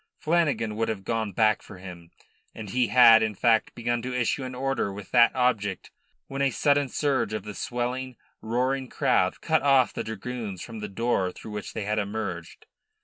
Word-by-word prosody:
Flanagan 150 -10 0
would 115 - 0
have 105 -3 -4
gone 110 0 -2
back 110 +1 +2
for 100 - -12
him, 90 -2 -11 0.5
and 105 -3 -7
he 125 +1 +2
had 115 -3 +7
in 110 -1 -1
fact 115 +2 +2
begun 120 0 -1
to 125 +1 -3
issue 125 +3 0
an 130 0 -6
order 135 -5 -1
with 100 0 -10
that 120 -1 +6
object 110 -6 0 0.3
when 135 0 -5
a 140 - +3
sudden 140 +1 +2
surge 135 -8 0
of 110 - -3
the 105 - -7
swelling, 125 +2 -3 0.3
roaring 130 +3 -1
crowd 95 0 +1
cut 160 -1 +2
off 135 -3 +4
the - - -3
dragoons 110 -3 -6
from 115 -2 -8
the 105 0 -5
door 95 -3 0
through 110 - -11
which 105 -1 -6
they 110 - -3
had 105 +1 0
emerged. 105 +2 -5
115 Hz, 190 wpm, -26 LUFS, 105-130 Hz, 0.5 s, had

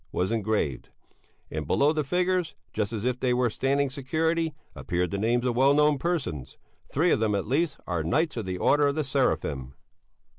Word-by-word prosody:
was 90 +4 -1
engraved; 105 - -1 0.6
and 75 -2 -4
below 145 - +3
the 155 -1 0
figures, 180 +2 0 0.2
just 105 0 -1
as 110 -1 -4
if 125 0 0
they 125 -1 +1
were 125 -2 +1
standing 140 +4 +1
security, 160 +4 -1 0.2
appeared 90 0 -2
the 100 - -1
names 120 +3 +1
of 120 -2 0
well 135 +3 +4
known 150 -1 +3
persons; 130 - -3 0.3
three 165 +5 +2
of - - +3
them, 110 -2 +1
at 100 - -1
least, 145 +5 0
are 85 -3 -2
knights 155 - +1
of 115 -4 -3
the 90 -1 -3
Order 145 +9 +3
of 140 - 0
the 155 - 0
Seraphim. 70 - -1
130 Hz, 190 wpm, -27 LUFS, 105-150 Hz, 0.6 s, well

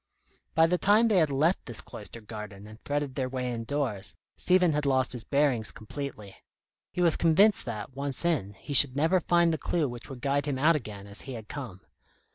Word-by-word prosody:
By 160 - +6
the 180 +2 +1
time 215 +3 +4
they 205 - +3
had 155 -3 +3
left 155 +7 +1
this 120 - -2
cloistered 110 +1 -7
garden 105 -2 -8
and 110 +1 -13
threaded 145 -2 -2
their 130 -1 -2
way 125 -1 -3
indoors, 115 -3 -3 0.2
Stephen 180 -3 +3
had 150 0 -1
lost 130 -2 +2
his 120 -3 -5
bearings 130 - +1
completely. 110 - -8 0.5
He 180 - -3
was 170 -2 +3
convinced 190 +6 +3
that, 110 0 -6
once 140 +3 -3
in, 130 - 0
he 145 - -7
should 135 -1 +7
never 160 +6 +3
find 170 -1 +2
the 155 - -3
clue 160 +2 0
which 120 +2 -9
would 130 -3 -9
guide 140 +1 0
him 140 -2 -1
out 155 +5 +4
again 105 -8 -6
as 100 0 -6
he 135 - -8
had 110 -3 -8
come. 120 -11 -7
140 Hz, 205 wpm, -28 LUFS, 115-160 Hz, 0.5 s, should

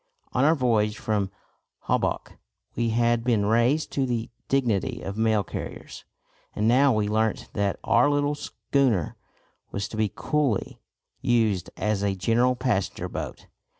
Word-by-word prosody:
On 130 - +2
our 155 +3 +5
voyage 110 -6 +1
from 105 -3 -1 0.5
Holboch - - -1 0.4
we 115 -1 0
had 115 0 +2
been 115 -4 +2
raised 120 +8 +2
to 135 -2 0
the 115 -2 -2 0.2
dignity 125 -2 0
of 100 - -5
mail 110 -1 +2
carriers; - - -7 0.5
and 105 - +1
now 135 +4 +5
we 110 -3 +1
learnt 110 +1 0
that 100 -1 0
our 120 +5 +4
little 145 0 +1
schooner 135 - 0 0.5
was 100 0 -3
to 110 - -7
be 110 -3 +1
coolly 145 -8 -1 0.4
used 110 -6 +1
as 105 -1 0
a 100 -1 +1
general 115 +7 +2
passenger 115 - -1
boat. - - -6
115 Hz, 145 wpm, -25 LUFS, 105-125 Hz, 0.5 s, our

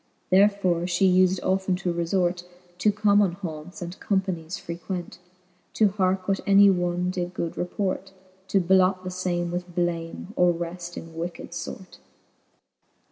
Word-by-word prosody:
Therefore 195 -2 +4
fhe 180 +1 +3
ufed 185 0 +3
often 190 0 +1
to 180 -1 -2
refort 175 +1 0 0.4
To 210 - +4
common 205 -2 +3
haunts, 175 -1 -7
and 175 +2 -8
companies 185 -4 -1
frequent. 175 +1 -6 0.5
To 215 -2 +4
hearke 190 -1 0
what 195 -1 +1
any 200 0 +7
one 175 0 0
did 180 -1 -4
good 170 - -3
report. 190 +1 -2 0.4
To 195 - +3
blot 185 +1 +3
the 185 - -4
fame 175 -1 -2
with 175 0 -5
blame, 175 +2 -2
or 180 -1 +4
wreft 175 +1 -6
in 165 0 -8
wicked 170 +1 -6
fort. 180 +2 -7
180 Hz, 140 wpm, -25 LUFS, 175-190 Hz, 0.5 s, any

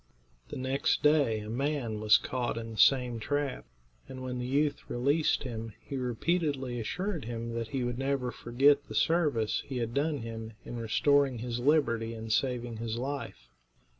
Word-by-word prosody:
The - - -6
next 130 +1 0
day 145 -8 +4
a 105 - -7
man 130 -4 -1
was 105 -1 +6
caught 125 -3 -2
in 115 0 -5
the 110 - -8
same 125 -3 +4
trap, 145 +3 -2 0.4
and 130 0 -7
when 125 -1 -3
the 125 - -3
youth 145 +2 0
released 140 +7 +1
him, 115 -4 -5
he 140 - -7
repeatedly 130 0 -1
assured 180 - -3
him 115 0 -4
that 115 -1 -3
he 130 +1 -2
would 120 0 -2
never 135 -2 0
forget 140 +5 +3
the - - -7
service 150 -10 +2
he 135 - -4
had 115 -1 -2
done 145 +2 +1
him 115 -1 -6
in 120 - -6
restoring 135 +3 +3
his 120 +1 -3
liberty 120 -5 +2
and 110 -1 -3
saving 120 -3 -1
his 115 0 -3
life. 130 - -5
125 Hz, 170 wpm, -30 LUFS, 115-140 Hz, 0.4 s, was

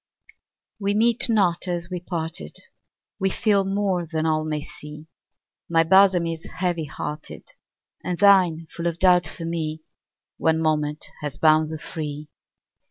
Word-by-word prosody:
We 200 0 0
meet 235 +3 +3
not 190 -5 +2
as 175 0 -3
we 180 - -3
parted, 165 - -5 0.6
We 195 - +1
feel 200 0 +2
more 195 -3 -1
than 160 0 -2
all 155 -1 +1
may 155 -1 -3
see; 150 +1 -10 0.6
My 165 -1 +4
bosom 190 0 +5
is 165 -1 -4
heavy 175 -3 -1
hearted, 150 +2 -7 0.6
And 180 -1 -2
thine 185 -5 +4
full 170 0 -2
of 170 -1 -2
doubt 180 -1 +4
for 165 - -6
me: 160 -2 -3 0.5
One 160 0 +2
moment 150 -1 -1 0.2
has 145 -2 -5
bound 155 0 +4
the 160 - -4
free. 150 -1 -6
165 Hz, 145 wpm, -23 LUFS, 155-185 Hz, 0.6 s, bosom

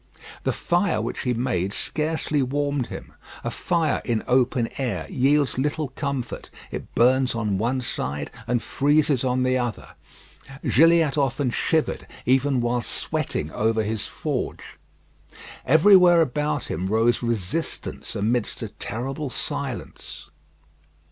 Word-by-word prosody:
The - - +2
fire 175 - +1
which 115 +2 -3
he 125 - 0
made 115 -6 -1
scarcely 155 0 -1
warmed 140 0 -1
him. - - -9 0.3
A - - -2
fire 170 -3 0
in 115 -3 -1
open 125 -2 +2
air 100 -12 -2
yields 140 -1 +2
little 150 +1 -1
comfort. 140 -4 -4 0.2
It - - -7
burns 130 +1 +3
on 105 -4 -1
one 125 +4 0
side, 75 - -3 0.2
and 120 -1 0
freezes 145 -2 +2
on 130 0 +1
the 130 0 +2
other. 120 -3 -3 0.7
Gilliatt 160 -1 +4
often 135 -1 0
shivered 160 +5 0 0.2
even 130 0 +3
while 120 0 0
sweating 75 -7 -2
over 110 +3 +1
his 110 0 -3
forge. - - -4 0.9
Everywhere 175 +3 +7
about 150 0 -1
him 95 - -2
rose 115 +4 +2
resistance 115 - -3
amidst 110 +2 0
a - - -4
terrible 135 +5 -4
silence. 130 -5 -6
130 Hz, 125 wpm, -24 LUFS, 115-145 Hz, 0.9 s, Everywhere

